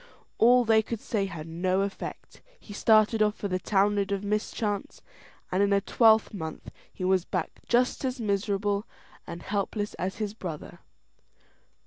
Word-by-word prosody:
All 245 Hz, +2 st, +6 dB
they 220 Hz, -1 st, +5 dB
could 225 Hz, +1 st, -5 dB
say 200 Hz, -3 st, -1 dB
had 165 Hz, -5 st, -7 dB
no 185 Hz, +3 st, 0 dB
effect: 200 Hz, 0 st, -6 dB, 0.2 s
he 205 Hz, -, -11 dB
started 215 Hz, +1 st, +4 dB
off 210 Hz, 0 st, +3 dB
for 205 Hz, -, -4 dB
the 185 Hz, -1 st, -1 dB
Townland 200 Hz, +1 st, +1 dB
of 200 Hz, 0 st, -1 dB
Mischance, 210 Hz, 0 st, -2 dB, 0.5 s
and 185 Hz, +2 st, +1 dB
in 200 Hz, 0 st, +3 dB
a 200 Hz, -, +4 dB
twelvemonth 210 Hz, -6 st, +2 dB, 0.2 s
he -, -, -8 dB
was 185 Hz, -1 st, +2 dB
back 180 Hz, -3 st, -4 dB
just 250 Hz, +3 st, +2 dB
as 255 Hz, -1 st, -2 dB
miserable 205 Hz, -1 st, -1 dB, 0.4 s
and 170 Hz, 0 st, -7 dB
helpless 205 Hz, +1 st, -2 dB
as 185 Hz, +3 st, -2 dB
his 210 Hz, -1 st, -3 dB
brother. 175 Hz, -8 st, -7 dB
205 Hz, 150 wpm, -27 LUFS, 190-215 Hz, 0.5 s, All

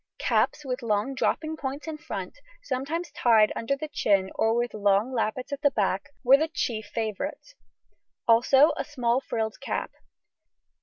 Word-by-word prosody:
Caps, 295 Hz, -, +1 dB
with 255 Hz, -1 st, -3 dB
long 215 Hz, +3 st, 0 dB
dropping 310 Hz, +4 st, -1 dB
points 275 Hz, +3 st, -5 dB
in 310 Hz, -1 st, -5 dB
front, -, -, -6 dB, 0.2 s
sometimes 330 Hz, -, -3 dB
tied 220 Hz, -3 st, +4 dB
under 275 Hz, +5 st, -1 dB
the 310 Hz, -, -5 dB
chin 195 Hz, -9 st, +1 dB
or 225 Hz, +1 st, +1 dB
with 240 Hz, 0 st, -1 dB
long 205 Hz, +4 st, +2 dB
lappets 250 Hz, +4 st, -2 dB
at 280 Hz, -, -5 dB
the 290 Hz, -, +5 dB
back, 195 Hz, -5 st, -1 dB
were 265 Hz, +2 st, +7 dB
the 315 Hz, +2 st, 0 dB
chief 245 Hz, -10 st, -3 dB
favourites, 230 Hz, -, -4 dB, 0.7 s
also 265 Hz, +6 st, +6 dB
a -, -, -1 dB
small 250 Hz, -3 st, 0 dB
frilled 220 Hz, -4 st, -3 dB
cap. 275 Hz, -, -3 dB
255 Hz, 155 wpm, -26 LUFS, 220-290 Hz, 0.7 s, were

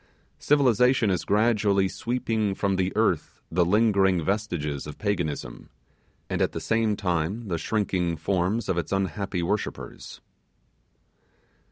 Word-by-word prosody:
Civilization 125 Hz, -5 st, +3 dB
is 90 Hz, -, -1 dB
gradually 105 Hz, -2 st, +2 dB
sweeping 110 Hz, -2 st, -1 dB
from 100 Hz, -1 st, 0 dB
the 95 Hz, 0 st, 0 dB
earth -, -, 0 dB
the 90 Hz, +2 st, +3 dB
lingering 95 Hz, -3 st, +3 dB
vestiges 85 Hz, -9 st, -2 dB
of 75 Hz, -, -8 dB
Paganism, 85 Hz, -, -3 dB, 0.6 s
and -, -, -2 dB
at -, -, +1 dB
the -, -, -3 dB
same 110 Hz, -1 st, +1 dB
time 95 Hz, +4 st, -2 dB
the 85 Hz, -2 st, -1 dB
shrinking 90 Hz, -3 st, -1 dB
forms 95 Hz, +6 st, 0 dB
of 85 Hz, -, 0 dB
its 85 Hz, -, -5 dB
unhappy 95 Hz, -1 st, -1 dB
worshippers. 105 Hz, +5 st, -4 dB
100 Hz, 125 wpm, -26 LUFS, 85-110 Hz, 0.6 s, Civilization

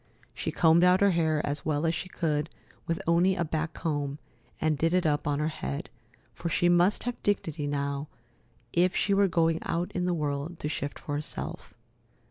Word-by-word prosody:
She -, -, -3 dB
combed 165 Hz, +1 st, +5 dB
out 180 Hz, +1 st, +5 dB
her 200 Hz, -1 st, +5 dB
hair 160 Hz, -3 st, +1 dB
as 145 Hz, +1 st, -2 dB
well 155 Hz, 0 st, 0 dB
as 165 Hz, -, +2 dB
she 185 Hz, -, -4 dB
could 155 Hz, -3 st, -1 dB, 0.4 s
with 165 Hz, -, -1 dB
only 175 Hz, +3 st, +3 dB
a 170 Hz, -, 0 dB
back 155 Hz, 0 st, -2 dB
comb, 145 Hz, -3 st, -2 dB, 0.4 s
and 155 Hz, -1 st, +2 dB
did 165 Hz, +4 st, +1 dB
it 185 Hz, -1 st, +2 dB
up 145 Hz, -1 st, +1 dB
on 145 Hz, -1 st, +1 dB
her 150 Hz, +1 st, 0 dB
head, 70 Hz, -, -5 dB, 0.4 s
for 170 Hz, -, -4 dB
she 175 Hz, +1 st, +2 dB
must 175 Hz, +3 st, +3 dB
have 245 Hz, 0 st, -4 dB
dignity 160 Hz, -7 st, -1 dB
now 140 Hz, 0 st, -2 dB, 0.7 s
if 180 Hz, +1 st, +3 dB
she 200 Hz, -, +2 dB
were 200 Hz, 0 st, +4 dB
going 165 Hz, -2 st, +2 dB
out 175 Hz, +1 st, -2 dB
in 180 Hz, -1 st, -1 dB
the 180 Hz, -, +1 dB
world 150 Hz, +2 st, -2 dB
to -, -, -1 dB
shift 145 Hz, -1 st, -3 dB
for 145 Hz, -, -6 dB
herself. 150 Hz, +1 st, -5 dB
160 Hz, 195 wpm, -28 LUFS, 150-175 Hz, 0.7 s, combed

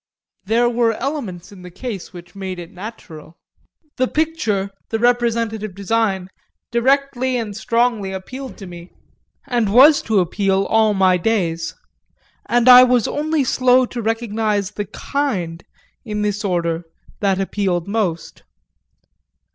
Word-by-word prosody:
There 230 Hz, +4 st, +2 dB
were 235 Hz, -1 st, +2 dB
elements 225 Hz, -, -5 dB
in 195 Hz, -2 st, -13 dB
the 180 Hz, -, -10 dB
case 200 Hz, +1 st, -6 dB
that 175 Hz, +1 st, -13 dB
made 190 Hz, -2 st, -5 dB
it 175 Hz, 0 st, -9 dB
natural: 180 Hz, -5 st, -10 dB, 0.6 s
the 255 Hz, -, +2 dB
picture, 235 Hz, -12 st, -1 dB, 0.2 s
the 225 Hz, -, -1 dB
representative 230 Hz, -4 st, 0 dB
design, 200 Hz, -2 st, 0 dB, 0.4 s
directly 260 Hz, +1 st, +1 dB
and 215 Hz, -4 st, -4 dB
strongly 230 Hz, -2 st, 0 dB
appealed 255 Hz, +8 st, -7 dB
to 195 Hz, -, -9 dB
me, 175 Hz, -1 st, -10 dB, 0.6 s
and 240 Hz, -6 st, 0 dB
was 280 Hz, +7 st, +7 dB
to 220 Hz, -, +3 dB
appeal 195 Hz, +2 st, +1 dB
all 220 Hz, -1 st, +3 dB
my 185 Hz, -1 st, +4 dB
days, 170 Hz, -5 st, -1 dB, 0.7 s
and 240 Hz, 0 st, +2 dB
I 250 Hz, 0 st, +11 dB
was 250 Hz, -3 st, +3 dB
only 305 Hz, 0 st, 0 dB
slow 255 Hz, 0 st, +3 dB
to 245 Hz, 0 st, -6 dB
recognise 220 Hz, -3 st, -1 dB
the 205 Hz, 0 st, -4 dB
kind, 190 Hz, -, -3 dB, 0.4 s
in 210 Hz, -2 st, -3 dB
this 210 Hz, +1 st, -1 dB
order, 170 Hz, -3 st, -1 dB, 0.4 s
that 195 Hz, -2 st, +1 dB
appealed 190 Hz, -3 st, -1 dB
most. 200 Hz, -6 st, -2 dB
215 Hz, 130 wpm, -19 LUFS, 190-240 Hz, 0.7 s, I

